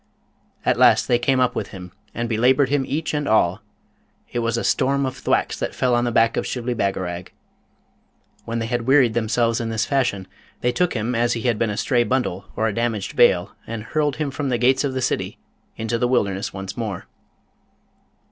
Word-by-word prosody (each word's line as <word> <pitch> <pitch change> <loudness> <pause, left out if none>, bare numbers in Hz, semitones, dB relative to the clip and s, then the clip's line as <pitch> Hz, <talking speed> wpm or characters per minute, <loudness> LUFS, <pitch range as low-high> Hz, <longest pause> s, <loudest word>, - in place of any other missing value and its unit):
At - - +2
last - - +5
they 120 - +3
came 130 +1 +2
up 125 -1 +2
with 105 - -3
him, 90 -2 -10 0.2
and 120 0 -3
belaboured 125 +4 +3
him 145 -1 +1
each 155 +3 -2
and 150 -1 -1
all; 105 -2 +2 0.7
it 120 - -2
was 115 0 0
a - - -2
storm 140 +1 +1
of 130 - -3
thwacks - - 0
that - - -3
fell 125 -1 +1
on 120 0 +2
the 120 - 0
back 115 0 +3
of - - -1
Shibli 125 -1 -2
Bagarag. 95 -5 -3 1.1
When 115 +1 -4
they 115 - -2
had 120 0 -2
wearied 130 -4 +5
themselves 115 +1 +1
in 115 - -3
this 115 0 0
fashion, 120 -8 0 0.3
they 125 - +2
took 180 +3 0
him 115 +2 -1
as 120 +1 +1
had 115 - -4
he 120 -2 +3
been 115 0 -1
a 105 - -3
stray 120 +1 +2
bundle 120 -6 -1
or 110 - +1
a 110 - -1
damaged 115 -3 -2
bale, - - +4 0.2
and 115 -1 -5
hurled 150 +2 0
him 150 -2 -2
from 140 0 -3
the 125 - +1
gates 130 +3 +3
of 135 -2 -2
the 130 - -1
city - - -2 0.4
into 115 +1 -2
the 125 - +2
wilderness 100 -6 0
once 95 -1 -6
more. 105 -6 -4
120 Hz, 205 wpm, -22 LUFS, 110-130 Hz, 1.1 s, last